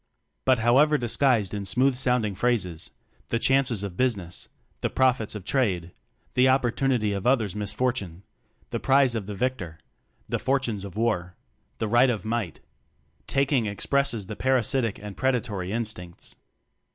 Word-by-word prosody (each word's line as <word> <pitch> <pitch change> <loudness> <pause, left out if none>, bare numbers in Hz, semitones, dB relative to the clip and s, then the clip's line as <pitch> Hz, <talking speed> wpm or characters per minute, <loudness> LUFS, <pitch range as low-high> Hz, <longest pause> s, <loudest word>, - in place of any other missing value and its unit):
But 130 -1 +4
however 135 +7 +4
disguised 120 -4 +1
in 100 -1 -3
smooth 125 +7 +2
sounding 125 -5 +1
phrases 95 -6 -1 0.4
the 115 - +1
"chances 130 -4 +2
of 100 -3 -5
business," 100 -8 -2 0.3
the - - 0
"profits 125 -5 +1
of 100 -4 -7
trade," 95 -11 0 0.4
the 130 +1 +4
"opportunity 125 -4 +1
of 100 +3 -2
others' 115 -7 +2
misfor 110 +4 -1
tune," 95 -6 -7 0.5
the - - -2
"prize 135 -2 +3
of 110 -4 -4
the 105 - -5
victor," 95 -9 -3 0.5
the - - -2
"fortunes 125 -6 -1
of 100 -1 -8
war," 90 -6 -1 0.4
the 110 - -2
"right 120 +4 +4
of 110 -3 -2
might" 110 -6 -3 0.7
taking 135 -4 +1
expresses 120 +1 0
the 110 - -6
par 130 +4 +2
asitic 115 -2 0
and 105 -1 -9
predatory 115 -8 -1
instincts. 105 -6 -5
115 Hz, 150 wpm, -26 LUFS, 100-130 Hz, 0.7 s, But